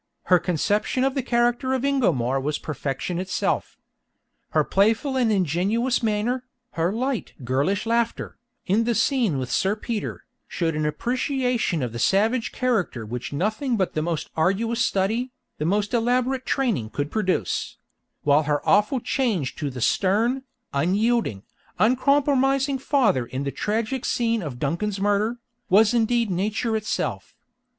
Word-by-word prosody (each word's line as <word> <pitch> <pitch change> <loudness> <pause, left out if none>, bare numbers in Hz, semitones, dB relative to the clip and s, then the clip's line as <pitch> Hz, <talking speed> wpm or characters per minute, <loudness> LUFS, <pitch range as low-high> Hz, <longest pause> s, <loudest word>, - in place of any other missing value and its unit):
Her 180 -1 +4
conception 200 - 0
of 270 0 +1
the 270 - -1
character 240 +1 +1
of 260 +1 -1
Ingomar 135 - +1
was 150 +2 -1
perfection 150 +4 -4
itself; 185 0 -2 0.7
her - - +2
playful 225 +8 +2
and 245 -4 +2
ingenuous 200 - +1
manner, 230 +3 0 0.3
her 170 +2 0
light 250 +2 -2
girlish 140 - 0
laughter, 230 0 -1 0.3
in 215 +5 +2
the 235 0 +1
scene 230 - +2
with 130 -1 -4
Sir 195 +8 +1
Peter, 220 -1 -4 0.2
showed 165 -3 -1
an 155 0 0
appreciation 250 - -1
of 120 - -3
the 115 - -5
savage 220 - +2
character 200 - -1
which 125 +3 -5
nothing 220 - -1
but 190 -3 0
the 155 - -1
most 160 -1 -3
arduous 225 +8 +1
study, 220 +6 0 0.3
the 150 - -1
most 205 +5 0
elaborate 250 +2 +1
training 230 - 0
could 145 +5 -3
produce; 190 -4 -1 0.5
while 145 +1 +4
her 145 -1 0
awful 210 +7 +3
change 220 - -1
to 145 -2 -2
the 125 -2 -7
stern, 220 - +2 0.3
unyielding, 190 - +1 0.3
uncompromising 270 +2 +2
father 245 - +2
in 130 +3 -4
the 140 - -2
tragic 225 - -2
scene 230 -2 0
of 145 -8 -5
Duncan's 180 +10 -2
murder, 205 +4 +1 0.3
was 210 +4 +5
indeed 235 -2 +2
nature 215 +5 -1
itself. 215 0 -3
215 Hz, 145 wpm, -24 LUFS, 165-245 Hz, 0.7 s, was